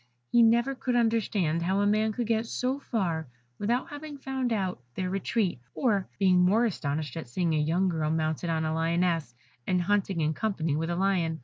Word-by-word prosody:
He 240 - +5
never 235 +4 +4
could 255 -1 -2
understand 210 -8 +1
how 190 +3 +1
a - - +2
man 215 +1 +2
could 235 +2 -2
get 225 +1 0
so 255 +4 -1
far 175 - -2 0.3
without 235 +5 0
having 290 0 -7
found 265 -2 -2
out 190 - -1
their 185 -1 -2
retreat, 195 - 0 0.2
or 205 -7 +1
being 185 -2 +4
more 200 +7 +4
astonished 150 -7 -2
at 160 -6 -5
seeing 165 +7 0
a 155 - +2
young 165 +5 +1
girl 160 -4 0
mounted 160 +1 -1
on 160 -1 0
a 155 - -1
Lioness, 165 -4 0 0.3
and 185 - +2
hunting 195 -2 +1
in 155 0 +1
company 165 -6 -1
with 165 +2 -1
a 170 - 0
Lion. 175 -4 +1
185 Hz, 195 wpm, -28 LUFS, 165-225 Hz, 0.3 s, He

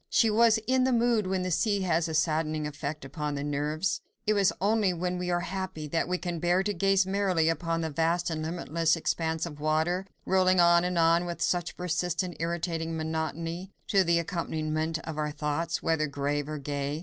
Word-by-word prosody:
She 225 -2 +3
was 225 +1 +5
in 260 0 +3
the 260 - +2
mood 235 -4 +2
when 185 -1 0
the 185 - -2
sea 205 +3 +1
has 170 -2 +1
a 160 - -3
saddening 155 -1 0
effect 150 0 -5
upon 145 +1 -4
the 140 - -3
nerves. 150 +4 -1 0.2
It 215 - +3
is 200 -2 +4
only 205 -2 +2
when 180 +1 -2
we 180 0 -3
are 175 0 +1
very 175 - -6
happy, 190 -5 -4
that 165 +2 0
we 180 0 0
can 175 -2 -4
bear 175 +3 +2
to 205 +1 -1
gaze 195 +1 +3
merrily 190 -4 +1
upon 165 0 -1
the 160 -1 -2
vast 165 +3 0
and 155 -1 -2
limitless 165 0 0
expanse 160 0 -1
of 150 -3 -8
water, 160 +5 0 0.2
rolling 185 -1 +3
on 170 0 +6
and 180 0 -1
on 165 +1 +4
with 175 -1 -5
such 175 -1 -1
persistent, 180 0 -1
irritating 165 -1 -2
monotony, 160 +3 -3 0.2
to 195 -2 +4
the 170 -1 +3
accompaniment 160 -2 -2
of 155 -2 -5
our 150 0 0
thoughts, 150 +3 -2
whether 160 -2 +1
grave 145 +1 -2
or 155 - -3
gay. 145 +1 -3
170 Hz, 200 wpm, -28 LUFS, 155-185 Hz, 0.2 s, on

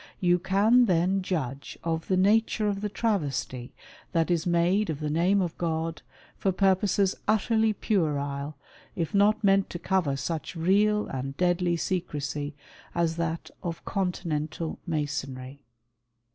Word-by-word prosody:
You 175 -1 +3
can 205 +7 +4
then 185 0 +2
judge 140 -7 -3
of 165 -1 -2
the 185 - +2
nature 215 +2 +3
of 200 -1 -1
the 210 - -2
travesty 145 - -2 0.4
that 165 0 +2
is 170 +1 +1
made 175 +4 +2
of 150 -3 -2
the 150 -1 -2
name 185 +5 +3
of 170 -2 -4
God 165 -1 -2 0.3
for 195 - 0
purposes 195 +1 +2
utterly 220 +1 +3
puerile, 145 -8 -1 0.4
if 165 +2 -2
not 210 +2 +3
meant 195 -1 +4
to - - -5
cover 180 -6 0
such 155 +5 -4
real 205 +5 +3
and 135 +1 -5
deadly 175 -1 +2
secresy 150 -5 -3 0.4
as 170 -1 +1
that 165 0 -3
of 170 -1 -5
Continental 165 -4 -2
Masonry. 140 -4 -3
175 Hz, 135 wpm, -27 LUFS, 155-195 Hz, 0.4 s, can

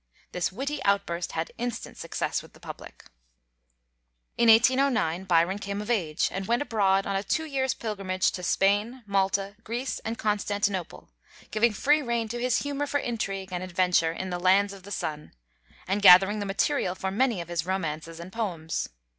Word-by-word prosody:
This 180 0 -1
witty 275 +7 -4
outburst 180 -4 0
had 160 0 -3
instant 245 -1 -4
success - - -3
with - - -16
the - - -18
public. - - -10 1.3
In 235 - +4
1809 225 -7 +4
Byron 180 +2 +2
came 200 0 -4
of 210 +3 -3
age, 170 -8 +1
and 190 0 -4
went 240 +4 +1
abroad 195 -6 +2
on 200 - -2
a 195 - +1
two 315 +10 -1
years' 265 -4 -1
pilgrimage 195 -4 -1
to 180 - -6
Spain, 205 +7 +1
Malta, 195 0 0
Greece, 240 +4 -3
and 225 +1 -5
Constantinople, 205 -3 -2 0.4
giving 225 +2 +3
free 295 +8 +3
rein 235 -3 -1
to 240 +2 -4
his 250 -1 +1
humor 285 0 -2
for 285 - 0
intrigue 195 -6 -3
and 180 - -2
adventure 180 -2 +2
in 185 +2 -5
the 175 - -2
"lands 195 +3 +3
of 195 - -11
the 195 - -12
sun," 150 -6 -4 0.5
and 195 +2 0
gathering 195 +2 +8
the 205 - -3
material 195 -2 0
for 190 0 -3
many 230 0 +1
of 170 - -6
his 170 -1 -3
romances 165 -3 -3
and 180 +2 -9
poems. 170 -8 -3
200 Hz, 175 wpm, -27 LUFS, 185-230 Hz, 1.3 s, gathering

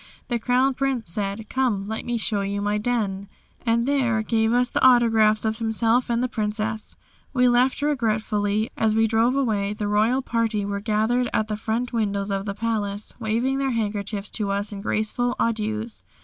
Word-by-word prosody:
The 240 -2 0
Crown 250 +3 +2
Prince 255 -8 -2
said, 205 +3 -3
"Come, 235 -7 0
let 220 +1 -4
me 240 -1 -1
show 215 -2 -1
you 200 +1 -2
my 205 +1 0
den," 210 -4 -1 0.4
and 230 +1 +2
there 245 -6 +1
gave 220 0 +1
us 245 +1 +2
the - - 0
autographs 225 -4 +5
of 220 +1 -1
himself 230 +2 +1
and 235 +1 +1
the - - +1
Princess. 215 -1 -2 0.4
We 250 -2 +4
left 250 +3 +2
regretfully. 215 -6 0
As 220 -1 +1
we 225 0 +4
drove 225 +3 +2
away 210 -7 0
the 210 0 -3
royal 220 +6 +2
party 225 -4 0
were 200 0 -2
gathered 220 +4 +1
at 215 0 0
the 210 - -1
front 225 +3 -2
windows 200 -3 -1
of 195 0 -2
the 200 - -3
palace 210 -2 -2
waving 235 +4 0
their 275 -1 0
handkerchiefs 205 -2 -3
to 210 -3 -2
us 200 +1 -1
in 200 - -6
graceful 220 +4 -1
adieus. 220 0 -2
220 Hz, 180 wpm, -24 LUFS, 210-240 Hz, 0.4 s, autographs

